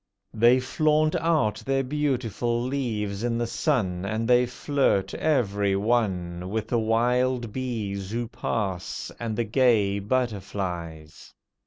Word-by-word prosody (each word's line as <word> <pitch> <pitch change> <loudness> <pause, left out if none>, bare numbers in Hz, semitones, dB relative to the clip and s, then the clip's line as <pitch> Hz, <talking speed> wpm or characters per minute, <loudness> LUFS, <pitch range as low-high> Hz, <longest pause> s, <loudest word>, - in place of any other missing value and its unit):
They 120 +3 +5
flaunt 155 +4 +2
out 155 -11 +1
their 135 0 +1
beautiful 125 -4 -1
leaves 115 -6 -2
in 120 -1 0
the 120 - 0
sun, 105 - 0
And 110 +3 -2
they 125 0 +4
flirt, 125 -7 0
every 100 -9 +1
one, 95 -5 0
With 110 +2 -3
the 120 - +2
wild 120 +1 +1
bees 105 -7 -3
who 120 +2 -2
pass, 100 -6 -3
and 115 -2 -3
the 120 - +1
gay 110 -4 +2
butterflies. 95 -8 -4
115 Hz, 125 wpm, -26 LUFS, 100-125 Hz, -, They